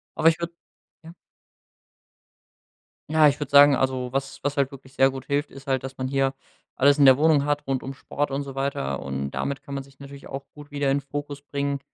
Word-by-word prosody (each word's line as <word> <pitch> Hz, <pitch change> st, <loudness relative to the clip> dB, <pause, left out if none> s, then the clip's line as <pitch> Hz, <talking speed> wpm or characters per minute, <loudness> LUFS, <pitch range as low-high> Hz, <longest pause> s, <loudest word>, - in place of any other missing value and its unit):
Aber 160 Hz, -, +5 dB
ich 165 Hz, -, -1 dB
würd 170 Hz, 0 st, -3 dB, 0.5 s
Ja. 165 Hz, +1 st, -11 dB, 2.0 s
Ja, 155 Hz, -1 st, +6 dB
ich 145 Hz, -, -3 dB
würd 145 Hz, -, -4 dB
sagen 145 Hz, 0 st, +8 dB
also, 130 Hz, -1 st, -1 dB
was 135 Hz, 0 st, -4 dB
was 145 Hz, +1 st, -2 dB
halt 140 Hz, -1 st, +2 dB
wirklich 135 Hz, -1 st, -13 dB
sehr 135 Hz, -1 st, +4 dB
gut 135 Hz, -1 st, -7 dB
hilft, 145 Hz, +1 st, 0 dB
ist 135 Hz, 0 st, -13 dB
halt, 135 Hz, -2 st, -1 dB
dass 135 Hz, 0 st, -8 dB
man 130 Hz, 0 st, -3 dB
hier 135 Hz, 0 st, +1 dB, 0.4 s
alles 140 Hz, +2 st, +4 dB
in 145 Hz, -, +5 dB
der 130 Hz, -1 st, +8 dB
Wohnung 150 Hz, -2 st, +3 dB
hat 145 Hz, 0 st, -1 dB
rund 135 Hz, -1 st, -1 dB
um 135 Hz, -, -6 dB
Sport 145 Hz, +2 st, -3 dB
und 140 Hz, +1 st, -2 dB
so 140 Hz, -1 st, -8 dB
weiter 135 Hz, -, -2 dB
und 70 Hz, 0 st, -4 dB
damit 140 Hz, 0 st, -3 dB
kann 140 Hz, -, -8 dB
man 135 Hz, -, -4 dB
sich 135 Hz, -1 st, -21 dB
natürlich 140 Hz, 0 st, -11 dB
ja -, -, -11 dB
auch 135 Hz, 0 st, -6 dB
gut 145 Hz, 0 st, -13 dB
wieder 145 Hz, -1 st, 0 dB
in 140 Hz, -, +2 dB
Fokus 145 Hz, +1 st, -6 dB
bringen 140 Hz, 0 st, -2 dB
140 Hz, 225 wpm, -25 LUFS, 135-145 Hz, 2.0 s, sagen